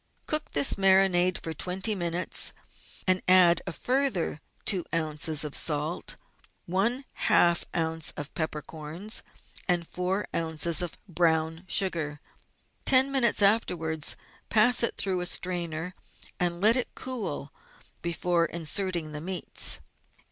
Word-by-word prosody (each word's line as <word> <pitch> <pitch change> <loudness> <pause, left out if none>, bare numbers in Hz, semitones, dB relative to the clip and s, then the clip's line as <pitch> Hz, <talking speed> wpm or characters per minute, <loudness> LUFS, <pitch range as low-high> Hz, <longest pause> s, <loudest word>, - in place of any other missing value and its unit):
Cook 305 0 0
this 145 +6 +3
marinade 190 -2 +4
for 160 - -4
twenty 185 +6 -1
minutes, 175 -2 +1 0.5
and 185 0 +2
add 180 -2 +6
a - - -2
further 245 - 0 0.2
two 185 -4 +3
oz. 155 -1 0
of 150 -2 -5
salt, 150 +2 0 0.5
one 230 +9 -1 0.2
half 170 0 +4
oz. 160 -1 -2
of 145 0 -6
peppercorns, 160 +5 -2 0.5
and 175 -2 +1
four 185 +3 -2
oz. 165 0 0
of 175 -2 -4
brown 160 -1 0
sugar. 165 -6 +1 0.6
Ten 265 +1 +6
minutes 240 -6 +3
afterwards 165 -7 +1 0.3
pass 225 +3 +4
it 235 - 0
through 185 -2 -1
a 180 - +2
strainer 175 -1 -2 0.5
and 175 -1 0
let 220 +3 +5
it 255 - -2
cool 215 - -5 0.5
before 170 0 0
in 170 0 -6
serting 170 -1 -1
the 150 - -5
meats. 180 +2 -1
175 Hz, 125 wpm, -27 LUFS, 160-195 Hz, 0.6 s, add